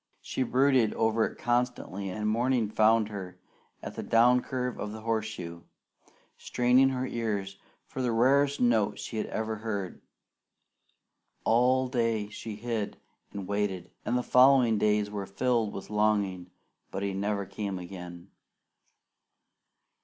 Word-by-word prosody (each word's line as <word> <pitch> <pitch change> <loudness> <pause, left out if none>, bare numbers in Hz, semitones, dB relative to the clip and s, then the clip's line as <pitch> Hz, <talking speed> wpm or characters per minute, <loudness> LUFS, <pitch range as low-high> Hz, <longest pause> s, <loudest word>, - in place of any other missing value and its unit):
She - - -3
brooded 130 -2 +3
over 110 0 +2
it - - -11
constantly, 120 -5 -1
and 105 +3 -3
morning 115 0 +1
found 110 0 +3
her 95 -3 -7 0.5
at - - -6
the - - -5
down 125 +2 +4
curve 125 -2 -3
of 105 - -4
the 110 - -8
horseshoe, 110 -7 -3 0.8
straining 125 +2 +3
her 130 -1 -2
ears 105 -5 -3 0.3
for 130 - -6
the 125 -2 0
rarest 140 +5 +3
note 110 -4 +2
she 110 - -5
ever 110 0 -3
had 105 - -15
heard. 100 -5 -4 1.4
All 125 +3 +3
day 115 -4 0
she 110 0 -7
hid 110 -1 -3 0.3
and 100 -2 -6
waited, 100 -3 -2
and 125 - 0
the 125 - -1
following 125 -4 +5
days 105 -1 +1
were 100 -2 -4
filled 115 +1 0
with 100 - -8
longing, 100 -4 0 0.4
but 95 - -4
he 100 -1 -1
never 100 +1 -1
came 100 0 -4
again. 90 0 -9
110 Hz, 140 wpm, -29 LUFS, 100-125 Hz, 1.4 s, following